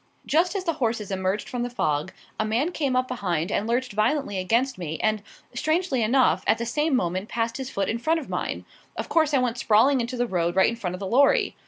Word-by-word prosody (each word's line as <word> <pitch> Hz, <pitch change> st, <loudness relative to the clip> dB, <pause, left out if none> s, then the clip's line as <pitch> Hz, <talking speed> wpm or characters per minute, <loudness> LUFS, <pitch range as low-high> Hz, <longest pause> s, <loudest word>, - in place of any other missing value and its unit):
Just 350 Hz, +6 st, +2 dB
as 390 Hz, -, -1 dB
the 335 Hz, -2 st, 0 dB
horses 225 Hz, -4 st, -1 dB
emerged 190 Hz, +2 st, -1 dB
from 245 Hz, -, -4 dB
the 245 Hz, -, -2 dB
fog, 155 Hz, -7 st, -1 dB, 0.3 s
a -, -, +2 dB
man 235 Hz, +10 st, 0 dB
came 280 Hz, -7 st, -1 dB
up 255 Hz, 0 st, +1 dB
behind 185 Hz, -8 st, -2 dB
and 215 Hz, -, -1 dB
lurched 245 Hz, 0 st, -1 dB
violently 215 Hz, 0 st, 0 dB
against 230 Hz, +5 st, 0 dB
me 160 Hz, -2 st, -4 dB
and, 215 Hz, -1 st, +1 dB, 0.3 s
strangely 310 Hz, +1 st, 0 dB
enough, 250 Hz, +4 st, +3 dB
at -, -, +4 dB
the 235 Hz, -, -3 dB
same 295 Hz, +4 st, 0 dB
moment 185 Hz, -1 st, -1 dB
passed 230 Hz, 0 st, -2 dB
his 265 Hz, -1 st, -5 dB
foot 200 Hz, -6 st, -2 dB
in 230 Hz, -, -1 dB
front 320 Hz, +6 st, +1 dB
of 290 Hz, -, -9 dB
mine. -, -, -3 dB, 0.3 s
Of -, -, -4 dB
course 315 Hz, -3 st, +3 dB
I 285 Hz, -, +3 dB
went 245 Hz, -2 st, 0 dB
sprawling 240 Hz, +6 st, +4 dB
into 245 Hz, +2 st, -4 dB
the 245 Hz, -, +1 dB
road 175 Hz, -5 st, -1 dB
right 190 Hz, -, +5 dB
in 230 Hz, -, -3 dB
front 180 Hz, -6 st, -4 dB
of -, -, -9 dB
the 200 Hz, -, -4 dB
lorry. 265 Hz, +8 st, +3 dB
235 Hz, 235 wpm, -25 LUFS, 200-270 Hz, 0.3 s, right